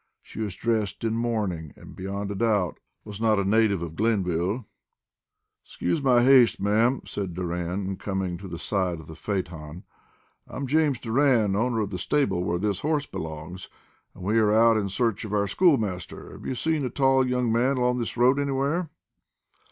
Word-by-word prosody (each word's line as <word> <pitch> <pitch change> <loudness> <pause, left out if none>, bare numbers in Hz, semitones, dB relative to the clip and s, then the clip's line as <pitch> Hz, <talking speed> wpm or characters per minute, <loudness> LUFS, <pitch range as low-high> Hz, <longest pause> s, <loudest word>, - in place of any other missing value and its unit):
She - - -11
was 105 -4 -3
dressed 110 -4 -1
in 115 -1 0
mourning, 105 -10 -2
and, - - -13
beyond 100 +2 -4
a - - -4
doubt, 105 -5 0 0.3
was 105 0 -8
not 110 -2 +3
a 100 - 0
native 100 -3 +2
of 80 -1 -7
Glenville. 100 0 0 1.0
"Excuse 90 +9 -2
my 125 -3 +4
haste, 130 -2 +6
ma'am," 110 +6 +2
said 95 -4 -5
Doran, 90 +2 -3
coming 95 -3 -3
to 100 - -8
the 85 -2 -6
side 90 -3 -1
of 80 - -11
the 80 - -10
phaeton. 85 -3 -5 0.6
"I'm 135 - -5
James 150 -1 +2
Doran, 115 -4 +2
owner 115 +1 +1
of 100 -2 -3
the 90 - -4
stable 100 -7 0
where 85 -1 -1
this 100 0 -1
horse 150 -1 0
belongs, 80 - -7 0.5
and - - -11
we 105 +4 +2
are 105 -1 +3
out 115 +1 +5
in 100 -2 0
search 110 +1 -1
of 105 -2 -6
our 100 -1 +2
schoolmaster. 105 - 0
Have - - -9
you 130 - -2
seen 160 +2 0
a 130 - -1
tall 135 +1 +3
young 125 -2 0
man 125 +4 +2
along 125 0 +1
this 120 0 -4
road 130 +4 +4
anywhere?" 140 +4 -1
105 Hz, 180 wpm, -26 LUFS, 95-125 Hz, 1.0 s, haste